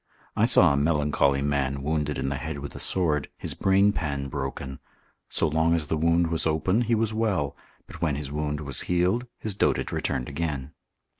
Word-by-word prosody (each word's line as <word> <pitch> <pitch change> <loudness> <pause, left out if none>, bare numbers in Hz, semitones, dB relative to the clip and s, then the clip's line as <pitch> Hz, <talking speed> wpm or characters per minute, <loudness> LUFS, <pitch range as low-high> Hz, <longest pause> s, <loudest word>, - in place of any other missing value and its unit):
I - - +3
saw - - +6
a - - 0
melancholy 70 -2 +2
man 70 -1 -1
wounded 75 0 -1
in 70 - -1
the 70 - -2
head 80 0 -5
with 70 0 -7
a - - -8
sword, 75 -6 +1
his - - -4
brainpan 95 -8 +1
broken; 65 -1 -5 0.5
so 85 - +1
long 80 +2 +2
as 75 -3 -2
the - - +1
wound 85 +1 +2
was 80 0 0
open 80 +8 +1
he 120 -1 +1
was 110 0 0
well, 100 - 0 0.3
but - - -12
when 75 -4 +1
his 70 -1 -5
wound 75 0 -2
was 70 -4 -1
healed, 90 +8 +1
his 110 - -3
dotage 100 - 0
returned 60 - -2
again. 75 -3 -4
75 Hz, 190 wpm, -26 LUFS, 70-85 Hz, 0.5 s, saw